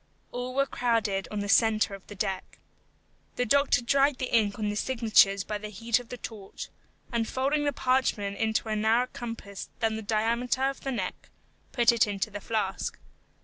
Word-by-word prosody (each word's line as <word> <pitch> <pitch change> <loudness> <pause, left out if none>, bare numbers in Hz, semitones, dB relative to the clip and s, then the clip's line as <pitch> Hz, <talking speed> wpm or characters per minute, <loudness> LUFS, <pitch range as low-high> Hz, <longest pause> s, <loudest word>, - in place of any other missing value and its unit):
All 250 +1 -4
were 275 0 +3
crowded 225 -7 0
on 210 -1 -3
the 205 - -3
centre 215 -1 +3
of 195 -1 -10
the 205 - -9
deck. 195 -2 -3 0.8
The 250 - 0
doctor 280 0 +3
dried 275 +2 +3
the 255 -2 -4
ink 205 -3 +2
on 210 -2 -1
the 205 - -2
signatures 215 -5 +3
by 210 0 -4
the 210 0 -6
heat 230 +3 0
of 245 - -12
the 250 - -6
torch, 210 -5 -8 0.4
and 230 -2 0
folding 285 +3 0
the 290 - +2
parchment 255 -7 0
into 220 0 0
a 215 - 0
narrower 220 +3 +3
compass 230 -4 -7
than 225 -2 0
the - - -4
diameter 230 +4 0
of 275 0 0
the 270 - -3
neck, 200 -7 -4 0.4
put 240 -2 +5
it 230 -2 +3
into 205 +1 -2
the 205 0 -6
flask. 210 -4 -2
225 Hz, 190 wpm, -28 LUFS, 205-250 Hz, 0.8 s, put